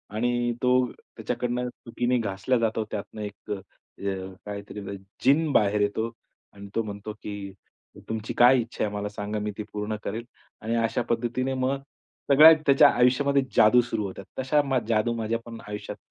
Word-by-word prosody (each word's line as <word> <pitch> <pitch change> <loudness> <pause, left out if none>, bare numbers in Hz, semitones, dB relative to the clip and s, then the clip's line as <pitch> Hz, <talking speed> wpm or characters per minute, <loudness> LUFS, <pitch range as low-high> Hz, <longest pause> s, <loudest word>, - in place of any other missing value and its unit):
आणि 120 +1 +1
तो 125 0 +4
त्याच्याकडून 125 0 -4
चुकीने 125 +1 -2
घासला 105 +4 0
जातो. 110 -1 0
त्यातनं 105 +1 -5
एक 105 0 -8
अ, - - +1 0.5
अ, 95 -1 -3
काहीतरी 105 0 -7 0.4
जीन 145 +3 +4
बाहेर 105 0 +3
येतो 110 +3 0 0.4
आणि 100 0 -10
तो 115 - +1
म्हणतो 105 0 -6
की 100 -2 -6 0.6
"तुमची 110 -1 -3
काय 125 +1 +7
इच्छा 115 -1 -3
आहे 105 - -4
मला 105 0 -3
सांगा, 105 +1 -4
मी 105 0 -2
ती 105 - -3
पूर्ण 105 +1 -2
करेल" 115 +3 -4 0.4
आणि 115 +2 -1
अशा 115 +2 0
पद्धतीने 120 +3 0
मग 130 +1 0 0.5
सगळ्या 155 +4 +10
त्याच्या 135 0 +7
आयुष्यामध्ये 135 +3 +3
जादू 120 +3 +6
सुरू 115 -3 -3
होतात. 95 0 -7
तशा 135 +3 +3
मा 135 -2 +1
जादू 115 +1 +2
माझ्या 115 0 -1
पण 115 -1 -8
आयुष्यात 105 0 -6
115 Hz, 165 wpm, -26 LUFS, 105-125 Hz, 0.6 s, सगळ्या